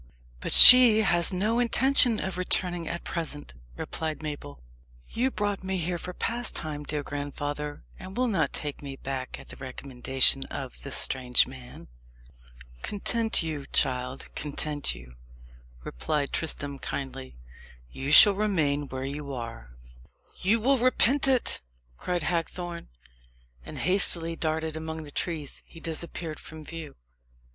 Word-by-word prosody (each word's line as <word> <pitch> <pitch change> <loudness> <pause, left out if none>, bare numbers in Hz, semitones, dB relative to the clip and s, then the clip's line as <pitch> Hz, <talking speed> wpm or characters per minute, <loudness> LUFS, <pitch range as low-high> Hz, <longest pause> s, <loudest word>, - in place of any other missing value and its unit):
"But - - -4
she 245 -4 +11
has 175 -3 +3
no 210 +6 -1
intention 245 -1 +5
of 190 -1 -4
returning 175 -2 +1
at 170 - -5
present," 150 - -4 0.2
replied 155 -1 -4
Mabel. 145 - -7 0.5
"You 250 +3 0
brought 205 -5 -3
me 190 0 -3
here 175 0 -3
for 180 - -7
pastime, 175 -9 -4
dear 150 0 -3
grandfather, 145 +1 -6 0.2
and 190 +3 -10
will 255 - +1
not 195 -9 0
take 145 -2 -5
me 140 -1 -8
back 135 -1 -6
at - - -14
the - - -11
recommendation 130 0 0
of 130 -3 -8
this 140 - -1
strange 125 -2 +2
man?" 130 -1 -13 0.9
"Content 225 0 -1
you, 150 -4 -6
child 125 0 -2
content 150 - -2
you," 60 0 -15 0.7
replied 140 - -3
Tristram 145 -3 -4
kindly. 65 - -7 0.5
"You 135 - -5
shall 205 +6 +8
remain 160 -9 -1
where 130 0 -6
you 140 +1 -6
are." 115 - -8 0.7
"You 210 +5 +1
will 265 +5 +2
repent 255 +3 +3
it!" 260 -3 +2 0.4
cried 175 -2 -3
Hagthorne. 170 +1 -4 0.7
And - - -10
hastily 170 -3 +4
darting 160 -1 -3
among 160 0 -6
the 145 - -11
trees, 155 -4 -4
he 165 - -14
disappeared 165 -1 -6
from 155 -1 -12
view. 160 -1 -9
160 Hz, 135 wpm, -26 LUFS, 140-185 Hz, 0.9 s, she